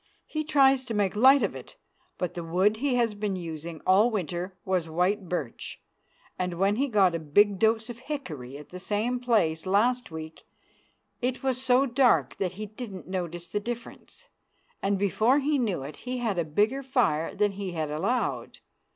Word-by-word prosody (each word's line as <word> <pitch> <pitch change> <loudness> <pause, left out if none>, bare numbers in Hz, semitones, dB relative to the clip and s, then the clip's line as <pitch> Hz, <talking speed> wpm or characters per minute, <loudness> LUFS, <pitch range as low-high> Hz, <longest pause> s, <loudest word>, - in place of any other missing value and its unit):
He 310 -1 -3
tries 275 -3 +4
to 230 -3 -4
make 205 -1 +1
light 265 +5 +6
of - - -1
it, - - -10 0.4
but 180 - -2
the 175 - -5
wood 185 +6 +2
he 265 +1 0
has 235 -3 +2
been 205 -1 -2
using 165 -2 -6
all 200 +5 +5
winter 185 -3 -3
was 180 -4 0
white 180 +3 0
birch, 150 -9 -4 0.6
and 180 -1 -1
when 195 +4 +2
he 275 +3 +1
got 200 -7 +3
a 165 - -1
big 195 +6 +3
dose 220 +1 +2
of 240 -1 -8
hickory 160 - -6
at 150 - -12
the 180 - -8
same 215 +6 -1
place 195 -9 +1
last 240 +5 +2
week 160 -1 -8 0.8
it 255 +2 -2
was 260 -1 0
so 260 +1 +4
dark 240 - +2
that 185 -2 -2
he 210 +3 -6
didn't 205 - -8
notice 175 -2 -4
the 205 +5 -2
difference, 240 - -8 0.6
and 200 0 +1
before 215 +6 +2
he 290 0 +1
knew 200 - -1
it 145 +3 -8
he 250 0 -4
had 220 -7 -1
a - - +2
bigger 210 - +1
fire 235 - 0
than 205 0 +2
he 195 -2 -5
had 155 -3 -2
allowed. 200 +12 -1
205 Hz, 185 wpm, -27 LUFS, 175-245 Hz, 0.8 s, light